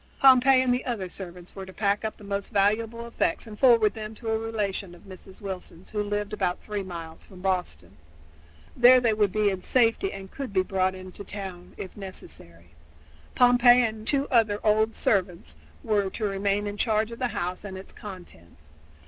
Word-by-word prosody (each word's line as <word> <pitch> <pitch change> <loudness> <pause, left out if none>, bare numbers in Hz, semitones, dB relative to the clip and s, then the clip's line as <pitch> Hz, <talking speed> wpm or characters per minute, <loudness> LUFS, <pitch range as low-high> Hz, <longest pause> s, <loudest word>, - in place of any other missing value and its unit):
Pompey 260 0 +6
and 250 -1 +2
the 250 - -1
other 225 -7 -3
servants 180 -1 -9
were 195 - -6
to 190 - -10
pack 200 +1 0
up 220 - -4
the - - -15
most 200 0 -3
valuable 225 +4 +1
effects 235 -7 -1
and 220 -2 -9
to - - -21
forward 230 -5 +5
them 215 0 -7
to 225 +1 -6
a 220 0 +1
relation 205 -5 -3
of - - -18
Mrs. 190 0 -13
Wilson's 190 -3 -7
who 210 - -1
lived 205 0 -2
about 180 -4 -1
three 210 -1 -4
miles 170 -4 -8
from 185 - -14
Boston. 180 - -2 0.8
There 250 +1 +7
they 235 -3 +2
would 210 -2 +2
be 210 0 +2
in 190 -1 -4
safety 245 - +2
and 195 -1 -9
could 270 -7 -6
be 185 -1 +3
brought 185 -1 0
into 185 +1 -9
the - - -17
town, 190 -3 -7
if 185 - -7
necessary. 85 - -9 0.6
Pompey 245 0 +6
and 220 -1 -3
two 280 +1 +1
other 220 -4 +3
old 220 +1 +2
servants 180 - 0 0.3
were 205 -3 +1
to 215 +3 -4
remain 200 +1 0
in 205 0 -4
charge 220 0 +1
of 230 - -8
the 255 - +1
house 180 -5 -4
and 190 -2 -7
its 190 - -9
contents. 85 - -12
205 Hz, 195 wpm, -26 LUFS, 185-225 Hz, 0.8 s, There